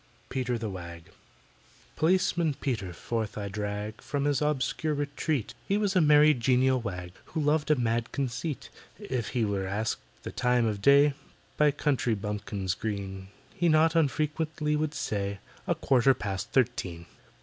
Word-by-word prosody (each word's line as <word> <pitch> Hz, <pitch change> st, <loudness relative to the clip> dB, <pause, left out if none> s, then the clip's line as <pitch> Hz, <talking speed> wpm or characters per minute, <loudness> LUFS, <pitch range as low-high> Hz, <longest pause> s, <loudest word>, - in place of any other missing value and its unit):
PETER 125 Hz, -2 st, -1 dB
THE 110 Hz, -3 st, -4 dB
WAG 85 Hz, -3 st, -9 dB, 0.8 s
POLICEMAN 170 Hz, -2 st, +2 dB
PETER 110 Hz, -11 st, -2 dB
forth 110 Hz, +4 st, -3 dB
I 100 Hz, -1 st, -3 dB
drag 105 Hz, +1 st, -4 dB
From 145 Hz, -1 st, -2 dB
his 145 Hz, -1 st, +1 dB
obscure 150 Hz, +1 st, 0 dB
retreat: 145 Hz, -3 st, -2 dB
He 200 Hz, -, +2 dB
was 205 Hz, -2 st, 0 dB
a 180 Hz, -, +5 dB
merry 150 Hz, 0 st, +6 dB
genial 130 Hz, +1 st, +2 dB
wag, 90 Hz, -5 st, -5 dB
Who 160 Hz, -, -4 dB
loved 150 Hz, +1 st, +1 dB
a 150 Hz, -, +6 dB
mad 115 Hz, -1 st, 0 dB
conceit. 140 Hz, +2 st, -3 dB, 0.3 s
If 130 Hz, -, -3 dB
he 115 Hz, -, +3 dB
were 100 Hz, -2 st, -1 dB
asked 105 Hz, +3 st, -1 dB, 0.2 s
the -, -, -5 dB
time 125 Hz, -1 st, +2 dB
of 105 Hz, -3 st, -1 dB
day, 140 Hz, +3 st, +6 dB, 0.4 s
By 150 Hz, 0 st, +4 dB
country 135 Hz, -5 st, +1 dB
bumpkins 100 Hz, -2 st, -3 dB
green, 95 Hz, -2 st, -4 dB, 0.3 s
He 175 Hz, -, +1 dB
not 160 Hz, +1 st, +4 dB
unfrequently 150 Hz, 0 st, 0 dB
would 150 Hz, 0 st, -1 dB
say, 100 Hz, -1 st, -2 dB, 0.3 s
"A -, -, +2 dB
quarter 135 Hz, 0 st, +3 dB
past 100 Hz, 0 st, -4 dB
thirteen." 90 Hz, -9 st, 0 dB
125 Hz, 150 wpm, -28 LUFS, 105-150 Hz, 0.8 s, merry